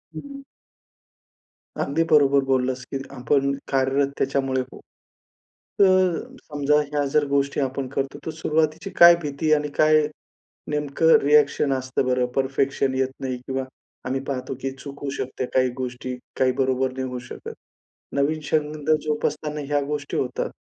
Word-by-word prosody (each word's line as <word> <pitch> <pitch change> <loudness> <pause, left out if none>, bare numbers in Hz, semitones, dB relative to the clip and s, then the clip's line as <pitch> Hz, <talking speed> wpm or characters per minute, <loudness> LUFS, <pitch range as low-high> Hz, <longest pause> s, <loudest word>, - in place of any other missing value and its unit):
हं. 275 - -9 1.4
अगदी 155 +4 +1
बरोबर 140 -2 +5
बोललास 130 -1 0
की, 135 - -1
आपण 140 +2 +1 0.2
कार्यरत 135 +1 +1
त्याच्यामुळे 135 -1 0
होऊ. 130 - -10 1.0
तर, 185 -3 +4 0.2
समजा 145 -1 0 0.2
ह्या 145 -1 0
जर 150 -1 +4
गोष्टी 140 0 0
आपण 135 0 -2
करतो, 135 0 -3
तर 160 - -2
सुरुवातीची 160 +3 -1
काय 170 0 +9
भीती 150 +1 -2
आणि 150 -1 +1
काय 155 0 +5 0.7
नेमकं 150 +2 +3
रिएक्शन 145 -1 +4
असतं 130 0 -1
बरं? 125 0 +2
परफेक्शन 135 0 0
येत 130 0 +1
नाही 130 -2 -3
किंवा 130 +2 -4 0.4
आम्ही 130 +1 -1
पाहतो, 130 -1 -3
की 135 - -2
चुकू 140 +1 -6
शकते 130 0 -3
काही 130 -1 +3
गोष्टी. 125 0 -4 0.2
काही 130 -1 +4
बरोबर 130 0 +1
नाही 130 0 -3
होऊ 125 0 -5
शकत. - - -8 0.6
नवीन 145 +3 +1
छंद 150 -1 -1
जोपासताना 150 0 -2
ह्या 145 0 +1
गोष्टी 145 0 -3
होतात. 125 -2 -2
140 Hz, 140 wpm, -23 LUFS, 130-150 Hz, 1.4 s, काय